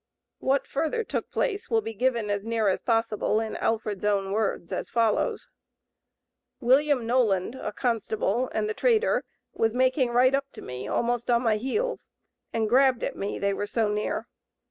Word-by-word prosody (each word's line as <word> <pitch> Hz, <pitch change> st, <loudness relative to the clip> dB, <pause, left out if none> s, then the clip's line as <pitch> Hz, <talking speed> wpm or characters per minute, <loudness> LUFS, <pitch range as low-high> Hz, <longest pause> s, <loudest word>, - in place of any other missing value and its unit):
What 270 Hz, +1 st, +1 dB
further 320 Hz, +10 st, -1 dB
took -, -, -4 dB
place 415 Hz, -5 st, -2 dB
will 225 Hz, -2 st, +2 dB
be 225 Hz, +1 st, -5 dB
given, 230 Hz, -2 st, 0 dB
as 205 Hz, -1 st, -1 dB
nearly 225 Hz, -3 st, +1 dB
as -, -, -2 dB
possible, 225 Hz, -2 st, +1 dB
in 220 Hz, -1 st, -3 dB
Alfred's 215 Hz, -3 st, -1 dB
own 200 Hz, -2 st, +1 dB
words 200 Hz, -4 st, -1 dB
as -, -, -3 dB
follows: 230 Hz, -2 st, +1 dB, 1.1 s
"William 265 Hz, 0 st, +3 dB
Noland 225 Hz, -5 st, +2 dB
(a 260 Hz, -5 st, -5 dB
constable), 230 Hz, +1 st, -1 dB
and 215 Hz, -1 st, -1 dB
the 215 Hz, -, -1 dB
trader 470 Hz, -, +2 dB, 0.3 s
was 225 Hz, +1 st, 0 dB
making 255 Hz, 0 st, +2 dB
right 250 Hz, +2 st, +4 dB
up 275 Hz, 0 st, 0 dB
to -, -, -10 dB
me 125 Hz, 0 st, -6 dB
almost 240 Hz, 0 st, -1 dB
on 240 Hz, 0 st, +3 dB
my 220 Hz, -3 st, +2 dB
heels, 425 Hz, -, -2 dB, 0.4 s
and 225 Hz, -1 st, 0 dB
grabbed 255 Hz, +1 st, +4 dB
at -, -, -2 dB
me, 200 Hz, -, -3 dB
they 200 Hz, 0 st, 0 dB
were 205 Hz, +1 st, -3 dB
so 220 Hz, 0 st, 0 dB
near. 210 Hz, +1 st, -2 dB
230 Hz, 170 wpm, -26 LUFS, 210-255 Hz, 1.1 s, right